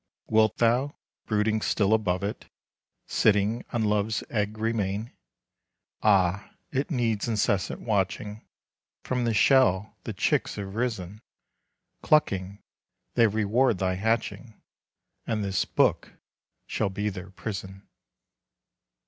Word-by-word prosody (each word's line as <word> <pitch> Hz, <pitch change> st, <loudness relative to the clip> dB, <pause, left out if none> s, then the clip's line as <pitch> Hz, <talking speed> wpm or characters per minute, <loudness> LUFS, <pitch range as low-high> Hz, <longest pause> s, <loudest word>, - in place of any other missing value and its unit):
Wilt 110 Hz, 0 st, +3 dB
thou, 125 Hz, +5 st, +2 dB, 0.3 s
brooding 110 Hz, 0 st, +1 dB
still 105 Hz, 0 st, +2 dB
above 100 Hz, -4 st, +1 dB
it, 100 Hz, +2 st, -5 dB, 0.6 s
Sitting 105 Hz, +2 st, +2 dB
on 115 Hz, -2 st, 0 dB
love's 105 Hz, 0 st, 0 dB
egg 105 Hz, -1 st, -1 dB
remain! 110 Hz, 0 st, -1 dB, 0.9 s
Ah, 100 Hz, -2 st, +2 dB, 0.2 s
it 135 Hz, +1 st, -1 dB
needs 120 Hz, -, 0 dB
incessant 100 Hz, -4 st, 0 dB
watching; 105 Hz, 0 st, -2 dB, 0.6 s
From 125 Hz, -1 st, -1 dB
the 115 Hz, -, +1 dB
shell 105 Hz, -5 st, +4 dB
the -, -, -4 dB
chicks -, -, 0 dB
have 100 Hz, -1 st, -6 dB
risen. 110 Hz, -4 st, -3 dB, 0.8 s
Clucking, 100 Hz, -9 st, +1 dB, 0.5 s
they 115 Hz, -, +5 dB
reward 110 Hz, +3 st, +2 dB
thy 95 Hz, 0 st, 0 dB
hatching, 110 Hz, +2 st, -2 dB, 0.7 s
And 110 Hz, -2 st, -1 dB
this 95 Hz, -2 st, 0 dB
book -, -, +1 dB, 0.5 s
shall 110 Hz, -, -1 dB
be 105 Hz, +2 st, -2 dB
their 95 Hz, -1 st, -8 dB
prison." 95 Hz, 0 st, -7 dB
105 Hz, 110 wpm, -27 LUFS, 100-115 Hz, 0.9 s, they